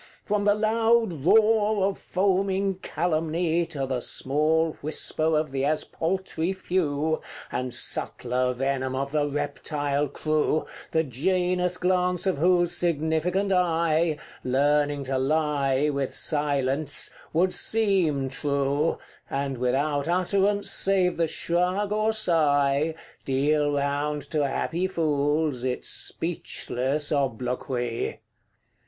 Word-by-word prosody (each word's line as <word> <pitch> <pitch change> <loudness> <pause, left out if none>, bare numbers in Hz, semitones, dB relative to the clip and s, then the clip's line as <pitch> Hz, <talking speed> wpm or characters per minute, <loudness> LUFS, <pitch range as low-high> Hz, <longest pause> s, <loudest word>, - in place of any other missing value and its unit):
From 205 -1 0
the 205 0 +4
loud 220 - +1
roar 215 0 +4
of 195 0 0
foaming 195 0 0
calumny 165 0 -1
To 145 -5 -3
the 130 -1 -2
small 155 +6 0
whisper 155 +1 0
of 155 -3 -1
the 135 0 -2
as 150 +2 +1
paltry 180 0 -2
few 160 -5 -1 0.3
And 125 0 -3
subtler 125 +1 +1
venom 130 0 -1
of 140 +1 -3
the 150 -1 +1
reptile 145 0 -2
crew, 155 +2 0 0.2
The 160 0 +1
Janus 180 +6 0
glance 180 0 0
of 185 -7 0
whose 175 +1 +3
significant 170 +4 0
eye, 165 -3 +1 0.3
Learning 145 +2 +1
to 135 0 -1
lie 145 -1 +1
with 140 -2 -2
silence, 145 -1 +1 0.2
would 180 +3 +2
SEEM 185 -11 +1
true, 140 +2 0 0.3
And 135 -2 -3
without 140 +4 0
utterance, 195 +3 +1
save 185 -2 +3
the 165 -1 +1
shrug 180 +6 -1
or 215 +1 +1
sigh, 155 -6 +2 0.3
Deal 145 +2 +1
round 145 +1 -1
to 150 -3 +1
happy 170 +6 -1
fools 150 -5 0
its 125 -1 -3
speechless 150 -4 -2
obloquy. 125 -3 -2
155 Hz, 110 wpm, -25 LUFS, 140-180 Hz, 0.3 s, the